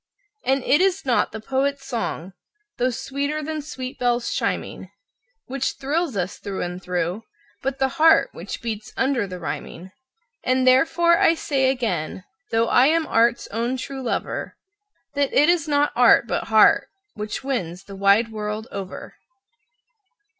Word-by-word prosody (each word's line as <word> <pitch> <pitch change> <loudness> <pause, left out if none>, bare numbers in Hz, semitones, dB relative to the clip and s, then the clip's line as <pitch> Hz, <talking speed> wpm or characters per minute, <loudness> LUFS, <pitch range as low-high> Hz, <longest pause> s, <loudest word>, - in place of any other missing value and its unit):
And 265 0 +1
it 295 +5 +3
is 380 -2 +1
not 250 -3 +2
the 220 - -6
poet's 270 +4 -1
song, 195 -7 -4 0.5
though 250 +1 +2
sweeter 280 +5 -3
than 310 0 -3
sweet 260 -3 -7
bells 245 -1 0
chiming, - - -3 0.6
Which 270 +1 -2
thrills 290 - -1
us 180 0 -3
through 195 -2 -4
and 180 +1 -5
through, 180 +2 -2 0.4
but 270 0 -2
the 265 0 +2
heart 320 -4 +6
which 180 +6 -8
beats 220 -2 -5
under 260 -6 +1
the 185 -1 -7
rhyming. 180 +1 -6 0.5
And 255 0 +2
therefore 330 +6 +4
I 330 - +4
say 270 -4 +1
again, 200 -10 -2 0.3
though 225 0 +2
I 250 +3 +5
am 325 +1 +2
art's 235 -1 +2
own 235 +4 -2
true 265 +1 -6
lover, 245 - -3 0.6
That 285 0 0
it 295 +3 +5
is 340 -3 +2
not 290 0 +2
art, 240 -1 +6
but - - -2
heart, 220 -1 +5 0.3
which 210 +2 -5
wins 190 -10 -3
the 200 -1 -10
wide 200 +4 +3
world 215 +1 -4
over. 195 -2 -7
250 Hz, 155 wpm, -23 LUFS, 210-280 Hz, 0.6 s, heart